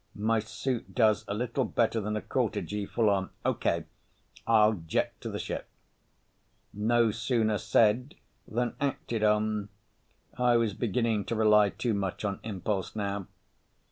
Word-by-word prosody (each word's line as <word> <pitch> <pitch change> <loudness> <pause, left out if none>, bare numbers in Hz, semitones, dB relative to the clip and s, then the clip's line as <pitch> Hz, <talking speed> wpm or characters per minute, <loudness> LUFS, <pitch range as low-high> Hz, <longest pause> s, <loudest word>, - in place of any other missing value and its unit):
My 110 +2 +1
suit 110 +3 -4
does 110 -3 +3
a 100 - -2
little 125 +4 -1
better 115 -2 +1
than 105 +1 -2
a 105 - -3
quarter - - 0
G 105 -1 -4
full 115 -2 +1
on. 95 -2 +1 0.2
Okay. - - +1 0.6
I'll 110 -1 +5
jet 80 -5 -1
to - - -4
the - - -4
ship._ - - -4 1.1
No 115 +2 +2
sooner 110 -1 0
said 115 +5 +2 0.3
than 120 +2 -1
acted 120 -5 -1
on—I 110 +3 -1
was 115 -3 +1
beginning 115 -1 0
to 115 - -2
rely 105 -2 +5
too 115 +3 -2
much 100 0 -2
on 100 -1 -2
impulse 100 -2 -3
now. 100 -2 -3
110 Hz, 140 wpm, -29 LUFS, 105-115 Hz, 1.1 s, I'll